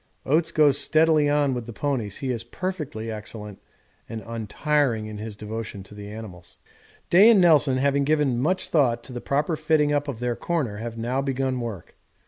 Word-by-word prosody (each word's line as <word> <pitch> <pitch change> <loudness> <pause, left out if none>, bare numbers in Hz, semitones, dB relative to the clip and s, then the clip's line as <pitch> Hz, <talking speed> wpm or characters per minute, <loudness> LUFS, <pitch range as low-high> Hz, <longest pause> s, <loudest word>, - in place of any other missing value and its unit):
Oates 160 +4 +2
goes 145 -3 +4
steadily 155 0 +3
on 145 -2 +2
with 120 -2 -5
the 120 - -7
ponies 115 -5 -2
he 135 -2 -3
is 115 -2 -3
perfectly 135 -6 -5
excellent 105 -1 -8 0.5
and 115 -1 -6
untiring 115 +2 -1
in 105 -1 -7
his 110 -1 -6
devotion 105 -1 -6
to 95 - -15
the 105 0 -9
animals. 100 -5 -10 0.5
Day 195 +6 +8
and 225 -4 +6
Nelson, 150 -7 +5
having 140 +1 +2
given 145 -4 +1
much 185 +8 0
thought 120 -7 +2
to 130 - -10
the 120 - -5
proper 150 +4 0
fitting 155 -1 +2
up 145 0 0
of 140 -5 -4
their 120 -1 -1
corner, 140 -12 -2
have 115 +1 -6
now 120 +4 -1
begun 135 -1 -1
work. 115 -8 -7
130 Hz, 185 wpm, -24 LUFS, 110-150 Hz, 0.5 s, Day